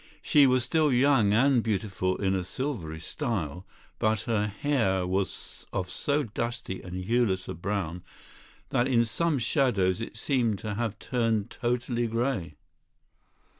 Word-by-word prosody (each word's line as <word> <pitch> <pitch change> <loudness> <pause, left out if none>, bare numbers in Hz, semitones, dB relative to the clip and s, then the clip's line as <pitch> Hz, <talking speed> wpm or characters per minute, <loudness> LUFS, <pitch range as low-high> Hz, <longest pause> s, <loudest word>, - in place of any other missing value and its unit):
She 145 -2 +6
was 130 -1 +3
still 155 +4 +2
young 125 -4 +4
and 125 +3 +4
beautiful 95 -4 -1
in 95 -2 0
a 95 -1 0
silvery 95 - -4
style, 90 - -3 0.3
but 110 -1 +2
her 110 -3 0
hair 105 -5 0
was 95 +1 -3
of 90 -2 -3
so 145 +7 0
dusty 115 -4 -4
and 90 0 -6
hueless 110 -4 +1
a 95 - -4
brown 90 -1 -3 0.7
that 120 - +2
in 120 -3 +3
some 160 +7 0
shadows 110 - +1
it 115 - -6
seemed 120 -4 +1
to 105 +1 -4
have 110 0 -2
turned 115 -5 0
totally 120 -1 -1
grey. 115 - -1
110 Hz, 140 wpm, -28 LUFS, 95-125 Hz, 0.7 s, She